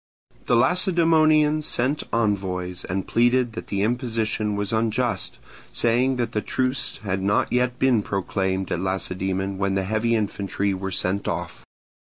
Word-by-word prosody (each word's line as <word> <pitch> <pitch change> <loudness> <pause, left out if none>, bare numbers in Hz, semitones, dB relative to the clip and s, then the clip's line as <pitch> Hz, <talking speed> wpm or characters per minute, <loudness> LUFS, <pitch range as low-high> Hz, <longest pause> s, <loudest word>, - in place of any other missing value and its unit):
The 120 - +3
Lacedaemonians 155 - +4
sent 130 +5 +1
envoys, 95 -5 -1
and 95 0 -3
pleaded 120 0 +2
that - - -7
the 100 -1 -1
imposition 110 -3 -1
was 100 +1 -2
unjust; 115 +2 -1 0.3
saying 120 - +2
that 120 -2 -2
the 105 - -1
truce 130 +2 -1
had 95 -2 -2
not 100 +4 +1
yet 125 0 +1
been 125 -4 +3
proclaimed 95 -1 -2
at - - 0
Lacedaemon 95 +1 -2
when 100 -1 0
the 95 - 0
heavy 110 +4 0
infantry 100 -2 -1
were 95 +1 -4
sent 95 +1 -1
off. - - -4
110 Hz, 145 wpm, -23 LUFS, 95-125 Hz, 0.3 s, Lacedaemonians